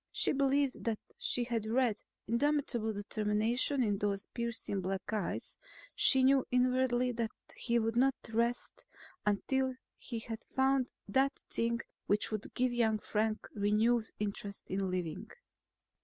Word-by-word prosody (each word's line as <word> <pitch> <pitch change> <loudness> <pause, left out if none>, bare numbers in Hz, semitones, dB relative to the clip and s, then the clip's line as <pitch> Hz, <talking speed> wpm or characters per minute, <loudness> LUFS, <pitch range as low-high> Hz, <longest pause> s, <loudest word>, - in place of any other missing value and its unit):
She - - +2
believed 275 0 +1
that 225 -2 +1 0.2
she 245 - +1
had 230 -3 -2
read 235 -2 +1 0.2
indomitable 240 -2 +1
determination 215 +6 +1
in 205 -3 0
those 200 -1 0
piercing 235 -4 -2
black 190 +3 -3
eyes; 210 -4 -3 0.4
she 265 -1 +5
knew 265 0 +5
inwardly 250 0 +2
that 230 -2 -1 0.3
he 235 -1 0
would 225 0 0
not 265 +2 +4
rest 235 +2 -1 0.4
until 260 +5 +1 0.2
he 235 - -5
had 225 0 -6
found 265 -1 +2 0.2
that 265 +6 +1
thing 235 0 0 0.3
which 210 +2 +2
would 215 -1 -4
give 250 0 +1
young 225 -3 +2
Frank 215 +1 -1
renewed 215 +3 +2
interest 200 -1 -4
in 190 0 0
living. 175 -4 -3
230 Hz, 135 wpm, -33 LUFS, 210-255 Hz, 0.4 s, she